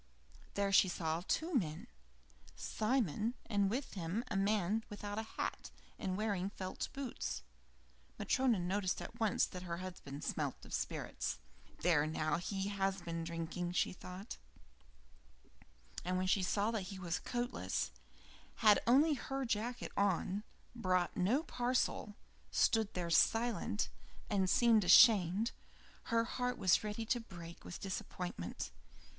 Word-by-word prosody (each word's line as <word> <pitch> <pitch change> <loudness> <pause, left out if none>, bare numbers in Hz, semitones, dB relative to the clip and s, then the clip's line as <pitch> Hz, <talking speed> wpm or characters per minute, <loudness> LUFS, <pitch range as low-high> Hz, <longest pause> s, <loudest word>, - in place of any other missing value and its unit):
There 200 0 +1
she 195 - +7
saw 165 -1 -1
two 335 +2 0
men: 165 - 0 0.7
Simon, 220 - 0
and 200 -2 +2
with 260 +6 -3
him 185 +4 -2
a - - -1
man 205 +1 +2
without 205 0 -4
a 220 - -8
hat, - - -3 0.3
and 185 -1 -2
wearing 200 -3 0
felt 185 -2 -5
boots. 265 - -4 0.7
Matryona 255 -4 +2
noticed 185 +1 0
at 230 - -8
once 220 -3 +3
that 180 - -8
her 170 -2 -4
husband 175 -6 -7
smelt - - -2
of - - -10
spirits. - - -2 0.4
"There 160 -4 +4
now, 155 0 0
he 195 +3 -2
has 195 -1 0
been 165 -1 -3
drinking," 170 +1 -3
thought 185 +3 -3
she. 60 0 -29 0.5
And 180 +1 0
when 185 - 0
she 190 +1 +3
saw 200 +4 +1
that 210 -5 -2
he 195 - -6
was 180 -2 -2
coatless, 245 0 -2 0.6
had 210 -3 +6
only 290 +6 +6
her 270 0 -3
jacket 235 +2 -2
on, 200 0 +1 0.3
brought 185 -6 +1
no 225 - +2
parcel, 245 -6 0 0.3
stood 220 -2 +3
there 175 -2 -2
silent, 225 - +2 0.4
and 190 -2 +2
seemed 225 +3 +5
ashamed, 195 +3 +7 0.5
her 230 -1 +2
heart 250 +1 -2
was 185 +1 +4
ready 215 +1 -3
to 240 +2 +1
break 170 -6 -10
with - - -7
disappointment. 180 - -4
195 Hz, 135 wpm, -36 LUFS, 175-225 Hz, 0.7 s, she